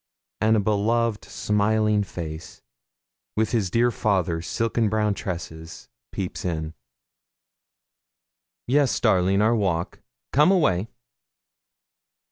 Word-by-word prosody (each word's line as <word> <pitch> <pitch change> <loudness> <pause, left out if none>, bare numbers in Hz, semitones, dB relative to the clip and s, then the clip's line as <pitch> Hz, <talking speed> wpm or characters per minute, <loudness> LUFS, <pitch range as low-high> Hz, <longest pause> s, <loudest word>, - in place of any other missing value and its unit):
and 110 +1 +3
a - - +3
beloved 110 +2 0
smiling 105 0 +1
face, 80 -4 -8 0.7
with 110 0 +1
his 110 -6 0
dear 120 +5 +2
father's 90 -7 0
silken 115 -1 0
brown 105 0 +1
tresses, 80 -4 -7 0.2
peeps 95 -2 -5
in. 80 -3 -3 1.9
'Yes, 140 +1 +2
darling, 95 -2 +3
our 115 +2 +3
walk. 95 -5 -1 0.3
Come 150 +5 +5
away!' 115 - +2
105 Hz, 95 wpm, -24 LUFS, 90-115 Hz, 1.9 s, Come